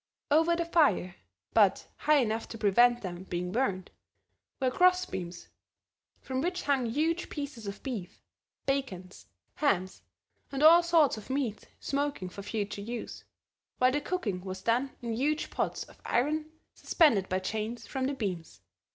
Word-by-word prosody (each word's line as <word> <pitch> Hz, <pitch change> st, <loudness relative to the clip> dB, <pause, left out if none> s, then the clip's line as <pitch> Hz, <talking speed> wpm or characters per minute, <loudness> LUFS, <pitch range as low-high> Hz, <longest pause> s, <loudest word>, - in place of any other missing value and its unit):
Over 325 Hz, +3 st, +4 dB
the 340 Hz, 0 st, -1 dB
fire, 290 Hz, -, +3 dB, 0.4 s
but -, -, +4 dB
high 305 Hz, 0 st, +3 dB
enough 225 Hz, -4 st, 0 dB
to 225 Hz, -, -8 dB
prevent 240 Hz, +4 st, +4 dB
them 175 Hz, -2 st, -5 dB
being 180 Hz, -1 st, -3 dB
burned, 195 Hz, -6 st, -1 dB, 0.7 s
were 260 Hz, -2 st, +1 dB
cross 365 Hz, +4 st, +4 dB
beams 175 Hz, -, -7 dB, 0.7 s
from 260 Hz, 0 st, -3 dB
which 355 Hz, +3 st, -2 dB
hung 270 Hz, -4 st, +1 dB
huge 320 Hz, +8 st, 0 dB
pieces 280 Hz, -7 st, -6 dB
of 200 Hz, +1 st, -7 dB
beef, 220 Hz, -10 st, -5 dB, 0.5 s
bacons, 230 Hz, -10 st, -3 dB, 0.3 s
hams 190 Hz, -10 st, 0 dB, 0.5 s
and 275 Hz, +1 st, -1 dB
all 335 Hz, +2 st, +9 dB
sorts 330 Hz, -7 st, +3 dB
of 215 Hz, -, -10 dB
meat 260 Hz, -6 st, -2 dB
smoking 280 Hz, -9 st, -2 dB
for 200 Hz, -, -8 dB
future 205 Hz, 0 st, -3 dB
use, 235 Hz, +3 st, -6 dB, 0.5 s
while 255 Hz, 0 st, +4 dB
the 290 Hz, +2 st, 0 dB
cooking 230 Hz, -, -2 dB
was 190 Hz, 0 st, -6 dB
done 240 Hz, +5 st, +1 dB
in 230 Hz, -1 st, -2 dB
huge 295 Hz, +7 st, 0 dB
pots -, -, -2 dB
of -, -, -18 dB
iron 305 Hz, +5 st, 0 dB, 0.2 s
suspended 230 Hz, -, +3 dB
by 185 Hz, -, +1 dB
chains 220 Hz, +5 st, -3 dB
from 265 Hz, -1 st, -2 dB
the 280 Hz, -, -2 dB
beams. 175 Hz, -, -5 dB
245 Hz, 150 wpm, -30 LUFS, 200-295 Hz, 0.7 s, all